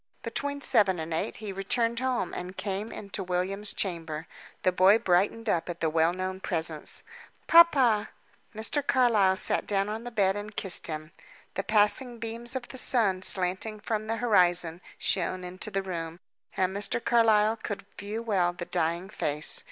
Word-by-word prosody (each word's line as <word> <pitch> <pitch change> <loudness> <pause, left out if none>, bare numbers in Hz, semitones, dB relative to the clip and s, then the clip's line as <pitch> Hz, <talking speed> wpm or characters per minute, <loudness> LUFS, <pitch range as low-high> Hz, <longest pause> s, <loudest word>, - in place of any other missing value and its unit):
Between 285 0 -3
seven 190 -8 +3
and 160 0 -5
eight 160 - -2
he 210 -1 -7
returned 230 +4 0
home, 255 -8 -1
and 180 +1 -7
came 200 +2 -4
into 200 -1 -5
William's 185 +3 -1
chamber. 165 -4 -3 0.4
The 185 - +3
boy 185 +4 +5
brightened 200 +4 +1
up 175 -4 0
at 175 0 -5
the 160 -1 0
well 165 +1 +3
known 185 +1 -4
presence. 160 -4 -1 0.4
"Papa!" 270 -11 +5 0.5
Mr. 220 +7 0
Carlyle 230 -9 +3
sat 190 - +1
down 200 0 0
on 220 +2 -5
the 245 - -6
bed 200 -4 +1
and 205 0 -7
kissed 190 -3 -1
him. 155 0 -6 0.4
The - - -2
passing 215 +4 +2
beams 230 +2 -2
of 255 -2 -4
the 260 - -3
sun, 205 -9 +3
slanting 190 +4 +2
from 215 0 -3
the 225 - -1
horizon, 180 -7 +3 0.2
shone 185 0 -1
into 185 +4 -5
the 195 -1 -2
room, 170 -2 -5 0.4
and 185 0 0
Mr. 205 +3 0
Carlyle 225 -2 +3
could 205 -3 -6
view 210 +3 -5
well 185 -6 +1
the 175 0 -7
dying 170 +1 -1
face. 150 -6 0
195 Hz, 165 wpm, -28 LUFS, 180-225 Hz, 0.5 s, boy